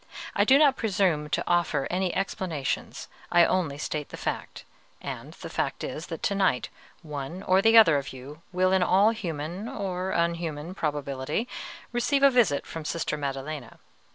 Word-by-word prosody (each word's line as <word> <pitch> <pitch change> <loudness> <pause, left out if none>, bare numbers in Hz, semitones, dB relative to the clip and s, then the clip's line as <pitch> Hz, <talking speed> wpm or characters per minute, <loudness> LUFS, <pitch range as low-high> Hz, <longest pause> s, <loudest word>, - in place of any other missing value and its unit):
I - - +4
do 270 - +7
not 285 -2 +5
presume 180 -8 +1
to 150 - 0
offer 175 -5 +1
any 185 0 0
explanations, 185 -7 -3 0.2
I 175 -1 +6
only 165 -7 0
state 150 0 -4
the - - -8
fact; - - -4 0.3
and - - -7
the - - -9
fact - - -2
is 160 - -5
that 165 - -7
to 200 - +1
night 190 -10 +1 0.3
one 150 +4 -6
or 185 0 +4
other 225 -9 +7
of 140 - -7
you 135 +4 -10
will, 185 +1 +2
in 190 -1 +3
all 195 +4 +5
human 175 +1 -4
or 190 -7 -3
unhuman 170 -2 -1
probability, 145 - -2 0.4
receive 275 +4 +1
a 275 - +8
visit 225 - +3
from 165 - -7
Sister 155 0 -2
Maddelena. 140 -1 -5
175 Hz, 160 wpm, -27 LUFS, 150-195 Hz, 0.4 s, a